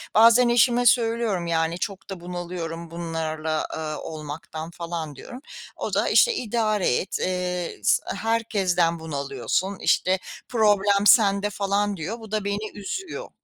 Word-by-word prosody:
Bazen 230 +2 +7
eşime 240 +1 +4
söylüyorum 230 -6 +2
yani 165 +1 0
“Çok 195 0 -5
da 195 -2 -6
bunalıyorum 170 -1 -6
bunlarla, 160 -2 -3
aaa, 155 -1 -5
olmaktan“ 155 +1 -7
falan 170 -3 -5
diyorum. 245 - -10 0.4
O - - -5
da, - - +2
işte, 480 -2 +5
“İdare 215 - 0
et, 190 - -3
eee, 180 -1 -2
s - - +4
e, - - -6
herkesten 195 -7 +1
bunalıyorsun, 160 +5 -2
işte 185 0 +2 0.3
problem 205 -3 +3
sende“ 205 -2 +5
falan 205 0 -1
diyor. 190 +9 -5
Bu 220 -2 -12
da 215 -2 -1
beni 205 +1 -3
üzüyor. 375 - -5
190 Hz, 140 wpm, -24 LUFS, 165-215 Hz, 0.4 s, Bazen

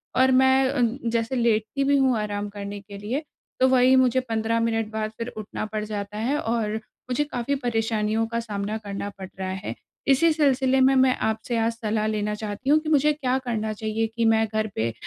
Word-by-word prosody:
और 260 +1 +4
मैं 260 -2 +3
जैसे 230 +2 -1
लेटती 235 +2 +1
भी 280 +1 +3
हूँ 260 -3 +3
आराम 205 -1 -3
करने 200 0 -6
के 200 0 -11
लिए, 230 +9 -3 0.4
तो 260 - +5
वही 255 0 +5
मुझे 260 -1 +4
15 230 -2 -1
मिनट 225 -1 0
बाद 215 0 -2
फ़िर 230 - -4
उठना 215 0 -5
पड़ 215 0 -4
जाता 210 -1 -5
है 255 +7 0
और 225 -2 -1 0.4
मुझे 255 +4 +1
काफ़ी 280 -1 -2
परेशानियों 225 -3 0
का 230 +1 -2
सामना 210 -1 -3
करना 200 -1 -5
पड़ 190 - -6
रहा 190 0 -2
है। 190 +1 -5 0.4
इसी 325 +5 +4
सिलसिले 265 -3 +2
में 265 +1 +5
मैं 260 -1 +4
आपसे 220 +2 -1
आज 225 0 +2
सलाह 220 -1 -2
लेना 210 -1 -1
चाहती 210 +5 -5
हूँ, 305 - +6
कि 310 0 -5
मुझे 300 0 +4
क्या 260 -3 0
करना 220 -4 -2
चाहिए 220 +1 -2
कि 230 0 +1
मैं 225 0 +4
घर 215 0 0
पे 115 +1 -1
225 Hz, 200 wpm, -24 LUFS, 215-260 Hz, 0.4 s, हूँ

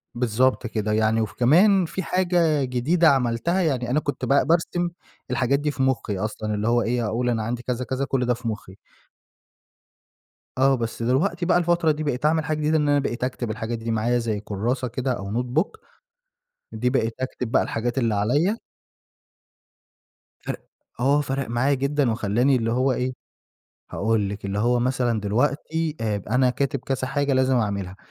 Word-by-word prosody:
بالضبط 125 +1 +1
كده، 110 -1 -2
يعني 110 +1 +2
وف 110 - -3
كمان 180 - +4
في 190 +3 -4
حاجة 175 -5 +2
جديدة 140 +7 +3
عملتها، 135 +7 +1
يعني 130 -8 0
أنا 140 - +2
كنت 145 -1 -3
ب - - -5 0.2
بارسم 175 +1 +1 0.4
الحاجات 130 +2 +1
دي 150 0 -1
في 135 - -2
مخي 120 -6 0
أصلًا، 105 +1 -3
اللي 105 +2 -2
هو 120 0 +3
إيه، 120 0 0
أقول 120 +4 -1
أنا 115 -2 0
عندي 120 +2 -3
كذا 125 0 -2
كذا 130 +1 -2
كل 135 -2 0
ده 125 - +2
في 120 0 -6
مخي. 105 -4 -5 1.8
آه، 135 +1 +4
بس 115 -1 -4
دلوقتي 170 +8 +1
بَقى 180 - +4
الفترة 175 -2 +2
دي 155 +1 -3
بقيت 145 -2 -2
أعمل 155 0 +2
حاجة 155 0 -1
جديدة، 155 +1 +1
إن 150 -1 +1
أنا 145 0 +4
بقيت 125 -3 -3
أكتب 125 -3 -2
الحاجات 115 +2 -4
دي 115 +1 -3
معايا 115 +2 +1
زي 110 -3 -2
كراسة 115 +5 -2
كده 130 +3 -2
أو 100 0 -6
notebook، 140 +9 0 1.0
دي 125 +3 0
بقيت 115 -3 0
أكتب 125 -2 -4
بَقى - - +3
الحاجات 120 +3 -2
اللي 115 -4 +1
عليَّ. 145 - +1 1.9
فَرَق - - -5 0.4
آه، 140 +4 +3
فَرَق 135 -1 -3
معايا 120 +4 +1
جدًا 140 -1 +1
وخلاني 115 +5 +2
اللي 115 -2 0
هو 130 +3 +2
إيه، 125 +1 -1 0.8
هاقول 110 -1 0
لِك، 100 0 -7
اللي 100 +1 -2
هو 120 +3 +2
مثلًا 125 -3 0
دلوقتي 145 +8 -1
آآ، 105 -3 -1
أنا 125 +2 +3
كاتب 140 +2 -1
كذا 130 0 -2
حاجة 140 +1 0
لازم 130 0 +3
أعملها، 100 -5 -2
125 Hz, 175 wpm, -24 LUFS, 115-145 Hz, 1.9 s, كمان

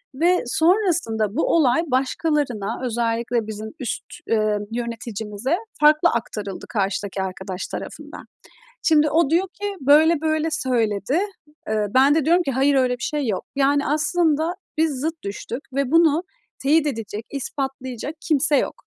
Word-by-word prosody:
ve 345 +6 +2
sonrasında 320 - +1
bu 315 - +1
olay 280 -3 +4
başkalarına 260 -4 -1
özellikle 235 -1 -1
bizim 215 0 -6
üst, 250 -5 -3 0.2
eee, 215 -2 +2
yöneticimize 230 - -3 0.2
farklı 305 +3 +6
aktarıldı, 210 - -4
karşıdaki 200 -1 -2
arkadaş 190 0 -5
tarafından. - - -8 0.6
Şimdi 305 -2 +4
o 320 -1 +3
diyor 355 +4 +2
ki, 410 -1 -2
böyle 300 +4 +5
böyle 315 0 0
söyledi. 240 - 0 0.5
Eee, 215 -1 0
ben 270 +3 +6
de 315 -2 +2
diyorum 345 +4 +4
ki, 280 - -2
hayır 270 +3 +3
öyle 255 -2 +3
bir - - -10
şey 295 -3 -1
yok. 200 - -2
Yani, 280 +1 +2
aslında 315 +2 +1 0.2
biz 320 0 +3
zıt 320 +2 -3
düştük 205 +5 -5
ve 275 -2 0
bunu 330 0 +4 0.4
teyit 300 +3 +3
edecek, 225 -5 -4
ispatlayacak 270 -1 -4
kimse 295 -1 +3
yok. - - 0
270 Hz, 140 wpm, -22 LUFS, 225-315 Hz, 0.6 s, farklı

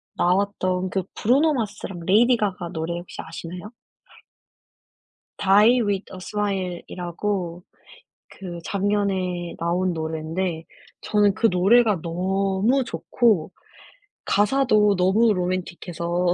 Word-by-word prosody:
나왔던 185 0 0
그 190 - 0
브루노 285 +7 +3
마스랑 200 -6 -5
레이디 235 +6 +4
가가 185 -5 -2
노래 165 0 -3
혹시 175 - -11
아시나요? 175 +5 -8 1.7
Die 210 +5 +5
With 200 -1 -1
A 185 - -8
Smile이라고 180 -2 -3 0.7
그 175 -3 -8
작년에 190 -3 -1
나온 175 +2 0
노랜데 160 +2 -3 0.4
저는 205 -1 +2
그 225 - +2
노래가 205 +2 +4
너무 190 +8 0
좋고 205 -12 +1 0.7
가사도 210 -1 +3
너무 205 +5 +3
로맨틱해서 175 -1 -2
190 Hz, 250 characters per minute, -23 LUFS, 175-210 Hz, 1.7 s, Die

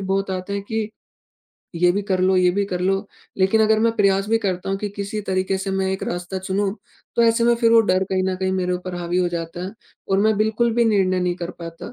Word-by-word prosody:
बहुत 195 0 -1
आते 185 +1 -4
हैं 200 0 -2
कि 220 0 -3 0.9
ये 175 +1 +3
भी 205 - -1
कर 185 - +2
लो, 185 0 +3
ये 180 -1 +4
भी 200 +3 0
कर 180 -2 -3
लो, 195 +2 0 0.3
लेकिन 190 +4 +3
अगर 220 0 +3
मैं 230 0 +3
प्रयास 195 0 +2
भी 225 - +3
करता 190 -4 -2
हूँ 195 - -1
कि 210 - -3
किसी 200 +1 -3
तरीके 190 0 -1
से 195 +1 -3
मैं 190 0 0
एक 190 - -4
रास्ता 175 +2 -4
चुनूँ, 195 +1 -1 0.4
तो 235 - +4
ऐसे 230 0 +3
में 235 0 +5
फिर 230 -1 +3
वो 230 - +8
डर 190 -3 +2
कहीं 185 0 +1
न - - -1
कहीं 190 0 -1
मेरे 180 -1 0
ऊपर 180 0 -4
हावी 175 +1 -1
हो 180 -1 +2
जाता 170 +1 -5
है 190 - -6 0.4
और 195 - +3
मैं 215 0 +3
बिल्कुल 220 +2 +1
भी 235 0 +3
निर्णय 190 -4 +2
नहीं 180 -1 0
कर 175 -1 -5
पाता। 165 +6 -8
190 Hz, 250 wpm, -22 LUFS, 185-210 Hz, 0.9 s, वो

